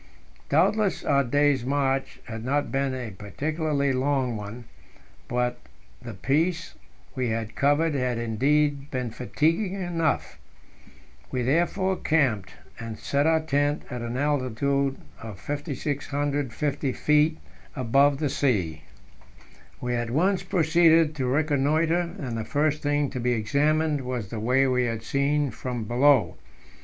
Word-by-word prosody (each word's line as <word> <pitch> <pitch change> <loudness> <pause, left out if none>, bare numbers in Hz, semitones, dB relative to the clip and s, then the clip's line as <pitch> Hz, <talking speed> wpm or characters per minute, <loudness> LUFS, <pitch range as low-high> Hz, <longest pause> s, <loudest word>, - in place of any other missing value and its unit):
Doubtless, 210 -2 +2
our 140 -1 +3
day's 145 0 +2
march 135 0 -1
had 110 -1 -7
not 145 +3 0
been 135 -1 0
a 125 -4 -5
particularly 140 - -1
long 130 -2 0
one, 105 +3 -7 0.6
but 125 0 -1 0.4
the 115 - -8
piece 165 - 0 0.4
we 130 -3 -1
had 110 -1 -3
covered 145 +5 +2
had 125 -3 -1
indeed 140 +5 +1
been 125 -3 -3
fatiguing 165 - 0
enough. 175 -4 -1 0.9
We 125 -1 -2
therefore 175 +7 +1
camped, 130 -11 +1 0.3
and 115 -1 -6
set 145 +2 0
our 160 0 +3
tent 145 0 0
at 125 -1 -4
an 120 +1 -4
altitude 140 0 0 0.2
of 110 -4 -8
5,650 145 0 -2
feet 150 +1 +2 0.4
above 135 +2 +3
the 150 -1 -1
sea. 100 - 0 1.0
We 125 0 -2
at 120 -1 -1
once 180 +9 +2
proceeded 165 -1 +3
to 130 -2 -1
reconnoitre, 155 +5 +1
and 125 -5 -4
the 115 - -2
first 150 +5 0
thing 145 -1 0
to 130 - -4
be 125 +1 +1
examined 145 +7 +1
was 125 -5 -4
the 110 - -5
way 125 +5 +3
we 125 -1 +2
had 115 -1 -3
seen 140 +3 0
from 125 -3 -4
below. 125 +2 +3
140 Hz, 130 wpm, -26 LUFS, 125-150 Hz, 1.0 s, our